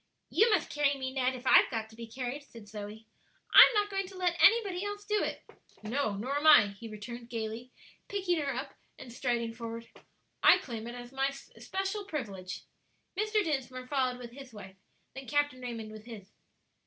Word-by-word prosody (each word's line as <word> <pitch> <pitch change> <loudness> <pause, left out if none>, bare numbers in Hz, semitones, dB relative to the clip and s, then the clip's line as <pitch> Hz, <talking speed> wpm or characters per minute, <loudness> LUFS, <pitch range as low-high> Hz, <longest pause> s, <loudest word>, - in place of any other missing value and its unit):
"You 450 +3 +5
must 400 -8 +1
carry 290 -1 +2
me, 260 -1 -4
Ned, 260 -1 +1
if 250 +1 -10
I've - - +7
got 225 -2 -3
to - - -15
be 230 0 -8
carried," 255 +4 -5
said 230 -6 -14
Zoe; 210 +1 -8 0.5
"I'm - - +10
not 415 0 +1
going 390 -1 -1
to 380 0 -11
let 360 -2 +1
anybody 405 -5 +5
else 410 0 -5
do 420 0 +1
it." - - -4 0.4
"No; 220 -1 -1
nor 255 +8 -2
am 300 +2 +1
I," 210 -9 +8
he 200 +3 -10
returned, 235 +3 -8
gayly, 230 +1 -5 0.4
picking 370 -4 0
her 285 -2 -1
up - - -5 0.2
and 240 - -10
striding 235 -2 -1
forward. 230 0 -7 0.5
"I - - +8
claim 230 -3 -6
it 240 - -6
as 245 0 -9
my 270 0 +1 0.3
especial 390 +2 -3
privilege." 200 - -5 0.5
Mr. 425 +1 +1
Dinsmore 260 -6 -3
followed 255 -2 0
with 240 -1 -9
his 270 0 -11
wife, 190 -3 -11 0.4
then 270 0 -9
Captain 290 -3 0
Raymond 230 -3 -6
with 215 0 -11
his. 210 -4 -10
255 Hz, 190 wpm, -31 LUFS, 225-305 Hz, 0.5 s, I'm